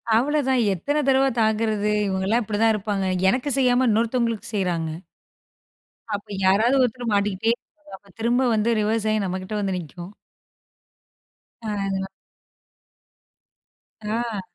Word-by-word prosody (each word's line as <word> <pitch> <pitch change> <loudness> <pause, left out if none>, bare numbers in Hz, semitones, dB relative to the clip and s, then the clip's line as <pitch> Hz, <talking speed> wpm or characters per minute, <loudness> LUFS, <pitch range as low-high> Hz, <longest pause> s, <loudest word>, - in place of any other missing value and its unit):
அவ்வளதான், 265 +1 +2
எத்தன 290 - -1
தடவ 270 0 +4
தாங்கறது? 215 -1 +1 0.2
இவுங்கலாம் 195 +5 0
இப்டிதான் 220 +1 +2
இருப்பாங்க. 200 -2 -2 0.2
எனக்கு 255 +7 0
செய்யாம 255 -1 +3
இன்னொருத்தவங்களுக்கு 230 0 0
செய்றாங்க 175 -5 -1 1.2
அப்பிடி 205 0 -5
யாராவது 225 +8 +3
ஒருத்தர் 245 -1 -1
மாட்டிக்கிட்டே 205 +2 +1
இருப்பாங்க. 295 -8 -16
திரும்ப 240 +3 +2
வந்து 215 +2 +1
ரிவர்ஸ் 220 +1 0
ஆயி 215 -1 0
நம்ம 185 0 -3
கிட்ட 200 +3 -7
வந்து 195 -2 -1
நிக்கும். 175 +4 -10 1.5
ஆ, - - -5 0.2
அதலாம். 190 0 -2 2.0
ஆ. 220 -1 -2
220 Hz, 110 wpm, -23 LUFS, 195-245 Hz, 2.0 s, தடவ